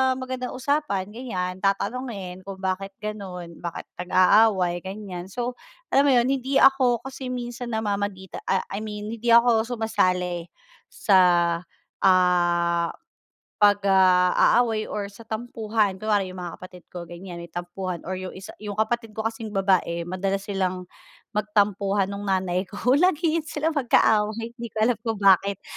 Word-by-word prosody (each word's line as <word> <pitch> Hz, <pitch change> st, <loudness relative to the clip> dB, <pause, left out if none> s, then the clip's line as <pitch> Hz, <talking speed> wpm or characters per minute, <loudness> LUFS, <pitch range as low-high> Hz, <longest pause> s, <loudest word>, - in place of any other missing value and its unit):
magandang 255 Hz, -1 st, -5 dB
usapan 255 Hz, -8 st, -1 dB
ganiyan? 185 Hz, -6 st, -4 dB
Tatanungin 195 Hz, -3 st, -2 dB
kung 195 Hz, -1 st, -8 dB
bakit 195 Hz, +1 st, -2 dB
gano'n? 185 Hz, -5 st, -6 dB
Bakit 170 Hz, -1 st, -5 dB, 0.2 s
nag-aaway, 185 Hz, -1 st, +4 dB
ganiyan? 190 Hz, -2 st, -6 dB
So 245 Hz, +2 st, -3 dB, 0.3 s
alam 275 Hz, +1 st, +4 dB
mo 285 Hz, -, +4 dB
'yun 240 Hz, 0 st, +4 dB
hindi 270 Hz, 0 st, +1 dB
ako 260 Hz, -3 st, +4 dB
kasi 260 Hz, -1 st, -6 dB
minsan 240 Hz, -1 st, -5 dB
namamagita 205 Hz, -3 st, -3 dB
ah, 190 Hz, -, +1 dB
I 200 Hz, +2 st, -4 dB
mean 210 Hz, 0 st, -6 dB
hindi 230 Hz, +1 st, -1 dB
ako 235 Hz, -1 st, +5 dB
sumasali 180 Hz, -7 st, 0 dB, 0.5 s
sa, 175 Hz, -3 st, +3 dB, 0.5 s
ah, 175 Hz, -2 st, +3 dB, 0.7 s
'pag, 205 Hz, 0 st, +6 dB
ah, 185 Hz, +1 st, +5 dB
aaway 225 Hz, -3 st, 0 dB
or 205 Hz, -1 st, -3 dB
sa 200 Hz, +3 st, -13 dB
tampuhan. 220 Hz, -2 st, -1 dB
Kunwari 205 Hz, 0 st, 0 dB
'yung 185 Hz, 0 st, -8 dB
mga 175 Hz, -1 st, -7 dB
kapatid 180 Hz, -1 st, -12 dB
ko 175 Hz, -1 st, -7 dB
ganiyan 175 Hz, +1 st, -9 dB
may 170 Hz, -, -8 dB
tampuhan 175 Hz, +1 st, -5 dB
or 185 Hz, +2 st, -4 dB
'yung 185 Hz, 0 st, -7 dB
isa, 195 Hz, +1 st, -9 dB
'yung 205 Hz, -1 st, -6 dB
kapatid 225 Hz, +1 st, -1 dB
ko 220 Hz, -, -3 dB
kasing 225 Hz, -1 st, -4 dB
babae 185 Hz, -3 st, +1 dB
madalas 190 Hz, +3 st, -2 dB
silang 185 Hz, -2 st, -1 dB, 0.5 s
magtampuhan 205 Hz, -2 st, +1 dB
nung 200 Hz, 0 st, -5 dB
nanay 185 Hz, -1 st, 0 dB
ko 215 Hz, +6 st, 0 dB
lagi 330 Hz, -2 st, +2 dB
iyan 310 Hz, -, -6 dB
sila 300 Hz, +1 st, -1 dB
magka-away, 225 Hz, -5 st, +2 dB
hindi 235 Hz, 0 st, -5 dB
ko 220 Hz, -, -35 dB
alam 235 Hz, -2 st, +1 dB
kung 225 Hz, -1 st, -2 dB
bakit. 195 Hz, 0 st, +4 dB
200 Hz, 150 wpm, -24 LUFS, 185-230 Hz, 0.7 s, pag